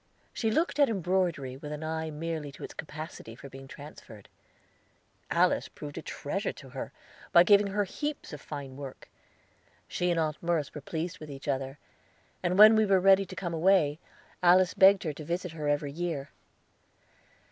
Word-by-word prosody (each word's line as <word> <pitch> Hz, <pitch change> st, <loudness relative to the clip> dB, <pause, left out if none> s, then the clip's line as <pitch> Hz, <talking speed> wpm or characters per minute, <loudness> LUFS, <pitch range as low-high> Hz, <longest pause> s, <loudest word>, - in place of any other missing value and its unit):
She 225 Hz, -, 0 dB
looked 315 Hz, +6 st, 0 dB
at 285 Hz, -, +6 dB
embroidery 180 Hz, -, -1 dB
with 150 Hz, +2 st, -8 dB
an 150 Hz, +1 st, -5 dB
eye 160 Hz, 0 st, -3 dB
merely 155 Hz, -1 st, -4 dB
to -, -, -11 dB
its -, -, -7 dB
capacity 155 Hz, -7 st, -8 dB
for 140 Hz, +3 st, -11 dB
being 135 Hz, +1 st, -11 dB
transferred. 135 Hz, -8 st, -12 dB, 1.0 s
Alice -, -, +2 dB
proved 75 Hz, -, -9 dB
a -, -, -5 dB
treasure -, -, -3 dB
to -, -, -13 dB
her, -, -, -6 dB, 0.4 s
by 170 Hz, -, +8 dB
giving 205 Hz, +2 st, +5 dB
her 205 Hz, +1 st, 0 dB
heaps 295 Hz, -, -5 dB
of 145 Hz, -, -7 dB
fine 140 Hz, -3 st, -7 dB
work. 140 Hz, -2 st, -9 dB, 0.8 s
She 180 Hz, -, -1 dB
and 170 Hz, -1 st, +1 dB
Aunt 155 Hz, -2 st, -1 dB
Merce 170 Hz, -4 st, -1 dB
were 150 Hz, -, -7 dB
pleased 170 Hz, +5 st, -4 dB
with 155 Hz, -, -9 dB
each 140 Hz, 0 st, -9 dB
other, 135 Hz, 0 st, -2 dB, 0.6 s
and 180 Hz, +1 st, 0 dB
when 215 Hz, +2 st, +10 dB
we 220 Hz, -1 st, +3 dB
were 195 Hz, -1 st, +5 dB
ready 195 Hz, +1 st, +5 dB
to 185 Hz, -, -9 dB
come 170 Hz, -1 st, -4 dB
away, 165 Hz, -3 st, +3 dB, 0.4 s
Alice 180 Hz, +1 st, +5 dB
begged 195 Hz, 0 st, +6 dB
her 155 Hz, -4 st, -2 dB
to 155 Hz, -, -9 dB
visit 175 Hz, +3 st, -3 dB
her 155 Hz, -2 st, -4 dB
every 145 Hz, 0 st, 0 dB
year. 155 Hz, -3 st, -4 dB
160 Hz, 180 wpm, -29 LUFS, 145-185 Hz, 1.0 s, when